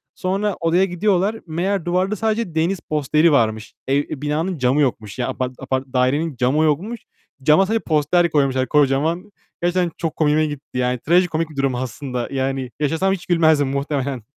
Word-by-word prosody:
Sonra 195 +2 -1
odaya 170 +3 +3
gidiyorlar. 195 +3 0
Meğer 175 +3 -1
duvarda 185 +4 0
sadece 220 -4 -1
deniz 170 +4 +1
posteri 155 +2 +2
varmış. 110 -5 +1
Eee, 140 +2 +1
binanın 160 +5 -1
camı 130 +2 +2
yokmuş. 115 -6 -2
Ya 125 - 0
apart 130 0 -3
apart 130 0 -2
dairenin 135 +4 +1
camı 130 +6 +2
yokmuş. 185 +10 -1 0.4
Cama 155 +7 +5
sadece 225 +3 0
poster 160 +3 +2
koymuşlar 135 -3 +1
kocaman. 150 +7 +1 0.3
Gerçekten 175 0 +1
çok 165 -2 -3
komiğime 155 0 +2
gitti. 145 -3 -7
Yani 125 -1 0
trajikomik 165 +1 +1
bir 155 - -13
durum 135 -2 0
aslında. 125 0 -4
Yani 135 -1 -2
yaşasam 160 +6 +1
hiç 180 - -6
gülmezdim 160 -5 +3
muhtemelen. 140 -2 -2
155 Hz, 160 wpm, -20 LUFS, 135-175 Hz, 0.4 s, Cama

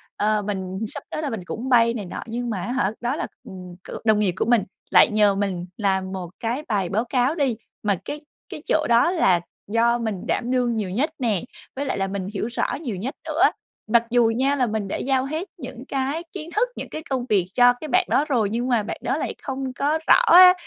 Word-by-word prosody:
ờ, 210 0 +1
mình 190 -2 -4
sắp 285 - -7
tới 310 - -3
là 300 - -2
mình 220 -7 -4
cũng 235 +7 -5
bay 230 -2 +5
này 215 -4 -4
nọ 175 - -6
nhưng 240 +1 -3
mà, 205 -5 -2
á - - -3
hả, 250 -6 +1
đó 245 +3 0
là, - - -3 0.2
ừm, 185 -6 -10
kiểu, - - -8
đồng 215 -2 +4
nghiệp 200 -4 +2
của - - +1
mình, 235 -3 +3 0.3
lại - - +7
nhờ 210 -2 +4
mình 195 -3 -2
làm 190 -3 0
một 185 -3 -5
cái 240 +6 -2
bài 200 -5 0
báo 220 +4 0
cáo 250 +4 +1
đi, 270 -8 0 0.3
mà 205 -2 +2
cái 295 - -5 0.3
cái 305 - -7
chỗ 310 -1 +2
đó 235 +8 +5
là 185 - +3 0.3
do 230 +3 +3
mình 220 -6 -4
đảm 245 +1 -1
đương 245 -2 +1
nhiều 210 -4 -2
nhất 255 - 0
nè, 220 -8 +1 0.3
với 280 +2 -2
lại - - -2
là 195 0 0
mình 195 -1 -4
hiểu 210 +1 -2
rõ 235 - -1
nhiều 245 -10 -3
nhất 240 +10 -4
nữa. 320 +1 -2 0.5
Mặc 230 +1 +4
dù 235 -1 +4
nha, 270 +3 +2
là 255 -3 +1
mình 215 -2 -2
đã - - -3
giao 265 0 0
hết 315 +7 -3
những 255 -7 -8
cái 275 +4 -2
kiến 310 - -6
thức, 485 +4 +2
những - - -6
cái 310 - -6
công 260 -3 -1
việc 190 -4 +2
cho 245 0 +6
cái 310 - -5
bạn 365 +4 +3
đó 290 - +3
rồi 230 -7 +2
nhưng 235 +4 -1
mà 240 -4 +2
bạn 210 - -5
đó - - 0
lại - - -3
không 265 -1 -4
có 295 +5 0
rõ - - +7
á. 365 -3 +9
235 Hz, 245 wpm, -23 LUFS, 205-270 Hz, 0.5 s, á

